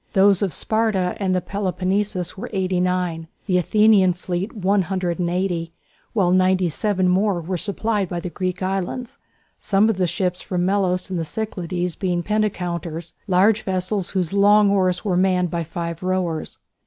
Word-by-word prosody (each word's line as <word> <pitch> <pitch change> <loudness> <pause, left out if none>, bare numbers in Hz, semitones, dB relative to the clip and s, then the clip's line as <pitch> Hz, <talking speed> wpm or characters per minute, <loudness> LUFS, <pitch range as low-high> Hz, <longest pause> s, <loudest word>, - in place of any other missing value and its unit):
Those 195 0 +4
of 195 -3 0
Sparta 215 0 0
and 190 -2 0
the 180 - +1
Peloponnesus 190 -1 -2
were 190 - -6
89, 180 -3 -1 0.2
the 185 -3 +2
Athenian 205 0 +4
fleet 180 +3 -4
180, 180 -3 -1 0.4
while 190 -6 +2
97 185 +1 +2
more 190 +1 +2
were 175 +3 -3
supplied 205 +1 0
by 175 - -3
the 175 0 -6
Greek 185 0 -3
islands, 195 +6 -3 0.4
some 205 +2 +3
of 205 - -5
the 185 -1 +1
ships 180 +1 -1
from 180 -1 -2
Melos 190 -1 0
and 180 - -1
the - - -1
Cyclades 180 -2 -3
being 180 -3 -1
penteconters, 175 -6 -2
large 200 +3 +4
vessels 185 0 -2
whose 185 -3 -1
long 205 0 +5
oars 185 -2 +1
were 195 - +1
each 180 - +3
manned 180 -2 +1
by 170 -1 -1
five 170 0 -5
rowers. 185 -3 -2
185 Hz, 155 wpm, -22 LUFS, 175-200 Hz, 0.4 s, long